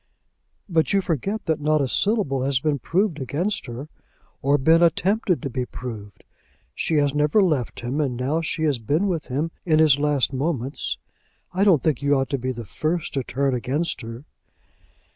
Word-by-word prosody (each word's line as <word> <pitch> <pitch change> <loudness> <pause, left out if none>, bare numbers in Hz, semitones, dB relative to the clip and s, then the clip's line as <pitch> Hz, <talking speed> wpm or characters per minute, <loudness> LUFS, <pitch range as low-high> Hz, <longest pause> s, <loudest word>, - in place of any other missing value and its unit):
"But 165 -1 +1
you 200 - +4
forget 190 - -2
that 160 -2 0
not 155 +1 +2
a 140 - +1
syllable 195 - +1
has 135 -1 +1
been 145 0 0
proved 170 - 0
against 155 - -2
her, 120 +5 -6 0.5
or 140 +2 +3
been 160 +5 +4
attempted 180 +2 +2
to 140 - -2
be 125 +1 -1
proved. 110 -5 -8 0.5
She 160 - -1
has 145 -2 +2
never 150 +6 +3
left 155 - +1
him, 125 +5 -1
and 130 -5 -1
now 140 +6 0
she 160 0 -3
has 145 -6 +1
been 150 - 0
with 170 -5 -2
him 145 +6 -2
in 155 -3 +3
his 155 -3 +5
last 145 -2 +1
moments. 135 -1 -2 0.6
I 190 +2 +2
don't 180 -9 +4
think 150 -6 +1
you 140 0 +3
ought 135 +2 -1
to 140 - 0
be 130 +1 -2
the 120 -2 -7
first 155 - -2
to 135 - 0
turn 135 +2 0
against 130 +5 -1
her." 115 +4 -8
145 Hz, 185 wpm, -23 LUFS, 130-165 Hz, 0.6 s, his